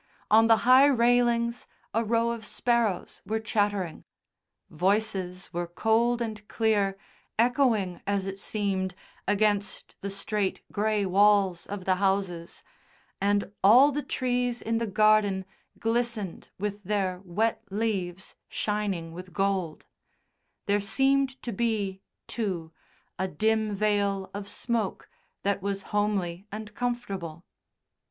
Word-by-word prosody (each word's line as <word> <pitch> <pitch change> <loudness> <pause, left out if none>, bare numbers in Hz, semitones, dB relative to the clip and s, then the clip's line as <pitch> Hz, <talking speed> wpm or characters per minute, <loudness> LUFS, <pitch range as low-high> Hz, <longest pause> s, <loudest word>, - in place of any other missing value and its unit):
on 225 +1 +7
the 225 -1 +6
high 260 +3 +8
railings, 240 -2 +2 0.3
a 225 - +2
row 230 +1 +1
of 230 -1 -5
sparrows 230 -3 0
were 220 +1 -1
chattering. 205 -5 -1 0.7
Voices 190 0 -1
were 175 0 -2
cold 230 +6 +2
and 215 -2 -6
clear, 205 -3 +1 0.4
echoing, 230 -6 +2
as 200 -1 0
it 195 0 -5
seemed, 195 -3 -2 0.3
against 205 0 0
the 200 - -3
straight, 200 0 -2
grey 210 -1 +1
walls 195 -1 +3
of 200 -2 -6
the 185 -1 +2
houses, 190 -3 -1 0.6
and 200 0 +1
all 250 +9 +8
the 295 +1 -2
trees 245 -2 -1
in 225 0 -1
the 230 - -1
garden 210 -2 +3 0.3
glistened 225 -4 -1
with 205 +1 -4
their 190 -2 -1
wet 220 +5 0
leaves 195 -3 -2
shining 200 -6 -2
with 180 +1 -9
gold; 195 -5 -1 0.8
there 205 0 +2
seemed 270 +5 +1
to 240 - -3
be, 200 -3 -1 0.2
too, 185 -8 -3 0.5
a 190 - 0
dim 215 +4 0
veil 200 -2 0
of 200 0 -6
smoke 230 -5 -2 0.4
that 200 0 0
was 195 0 -2
homely 200 -3 0
and 215 0 -7
comfortable. 195 -9 -4
205 Hz, 120 wpm, -27 LUFS, 190-225 Hz, 0.8 s, high